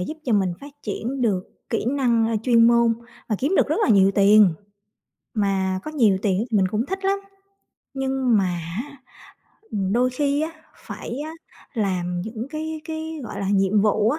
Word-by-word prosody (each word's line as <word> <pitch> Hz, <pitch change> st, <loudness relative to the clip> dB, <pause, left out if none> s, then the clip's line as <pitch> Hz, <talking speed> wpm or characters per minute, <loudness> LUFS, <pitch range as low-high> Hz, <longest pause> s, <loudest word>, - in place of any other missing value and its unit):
giúp 310 Hz, -, -4 dB
cho 245 Hz, -, 0 dB
mình 190 Hz, -3 st, +2 dB
phát 285 Hz, +1 st, -10 dB
triển 240 Hz, +5 st, -4 dB
được 195 Hz, -6 st, +1 dB, 0.3 s
kỹ -, -, -1 dB
năng, 245 Hz, -5 st, +2 dB
a, 225 Hz, -, 0 dB
chuyên 230 Hz, -1 st, +5 dB
môn 235 Hz, -1 st, +4 dB, 0.3 s
và 215 Hz, -, 0 dB
kiếm 300 Hz, +9 st, 0 dB
được -, -, +3 dB
rất -, -, +1 dB
là -, -, 0 dB
nhiều 195 Hz, -2 st, +6 dB
tiền, 200 Hz, -3 st, +6 dB, 0.8 s
mà 190 Hz, -3 st, 0 dB
có -, -, -5 dB
nhiều 230 Hz, -11 st, +3 dB
tiền 195 Hz, -4 st, +2 dB
ấy 230 Hz, -, -2 dB
thì 220 Hz, -, +2 dB
mình 190 Hz, -2 st, +3 dB
cũng 215 Hz, +6 st, -1 dB
thích 385 Hz, +3 st, -4 dB
lắm. 395 Hz, +1 st, +1 dB, 0.7 s
Nhưng 265 Hz, -3 st, +1 dB
mà 195 Hz, -, +2 dB, 0.4 s
á, 285 Hz, 0 st, -13 dB, 0.7 s
ừm, 195 Hz, -2 st, -1 dB
đôi 250 Hz, +3 st, +2 dB
khi 280 Hz, +2 st, 0 dB
á, 320 Hz, -, -2 dB, 0.4 s
phải 240 Hz, +4 st, -6 dB
á 315 Hz, -, -6 dB, 0.4 s
làm 180 Hz, -5 st, -1 dB
những 220 Hz, +3 st, -5 dB
cái 315 Hz, 0 st, -4 dB
cái, 320 Hz, -1 st, -5 dB
gọi -, -, -6 dB
là, 195 Hz, -, -2 dB
nhiệm 195 Hz, +1 st, +3 dB
vụ 215 Hz, +1 st, +3 dB
á 300 Hz, -, -1 dB
230 Hz, 195 wpm, -23 LUFS, 200-280 Hz, 0.8 s, nhiều